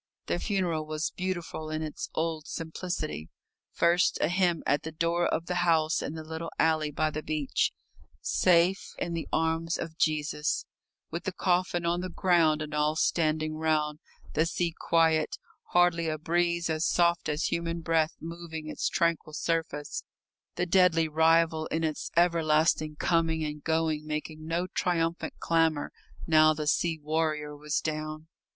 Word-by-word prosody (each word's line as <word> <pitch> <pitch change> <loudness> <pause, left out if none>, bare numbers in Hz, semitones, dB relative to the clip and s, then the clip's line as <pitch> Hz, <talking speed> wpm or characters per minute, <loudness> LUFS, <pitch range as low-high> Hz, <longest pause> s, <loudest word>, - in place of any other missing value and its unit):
The 85 - -1
funeral 175 -6 -1
was 155 +1 -2
beautiful 175 -4 -4
in 155 0 -2
its 155 - -5
old 160 -1 -2
simplicity. 160 - -4 0.4
First 170 +2 +3
a - - +2
hymn 175 -2 +1
at 145 - +2
the 160 - -6
door 170 +2 +1
of 165 - -1
the 180 - -2
house 160 -2 +2
in 150 - -4
the 160 - -6
little 160 +1 -5
alley 155 -1 +2
by 155 +1 0
the 155 - -4
beach, 150 -3 0 0.5
"Safe 180 +2 +3
in 175 - -3
the 165 -1 -3
arms 165 +1 0
of 160 -1 -6
Jesus," 150 -1 0 0.5
with 170 - -5
the 190 - -1
coffin 180 -1 0
on 175 +1 +1
the 185 - -4
ground 165 -4 +3
and 150 0 -7
all 150 +1 +1
standing 155 -1 +1
round; 155 -1 0 0.3
the 160 +2 +2
sea 170 -1 -1
quiet, 160 -2 +2 0.3
hardly 175 -2 +3
a 155 - -2
breeze 170 +2 0
as 160 -1 -1
soft 170 -2 +2
as 150 +1 -1
human 170 0 -2
breath 160 -1 +1
moving 165 -1 -7
its - - -1
tranquil 170 -3 0
surface; 160 -2 -2 0.5
the 175 - 0
deadly 175 -3 +4
rival 160 0 +3
in 165 +1 -2
its 155 -2 -2
everlasting 155 -2 +3
coming 165 0 +1
and 150 0 -6
going 160 -1 0
making 155 +1 -5
no 170 +2 0
triumphant 170 -2 -1
clamour 165 -3 +1 0.3
now 155 -1 +5
the 155 0 -3
sea 160 +2 +1
warrior 155 -1 -1
was 150 0 -1
down. 155 0 -4
160 Hz, 155 wpm, -28 LUFS, 155-170 Hz, 0.5 s, now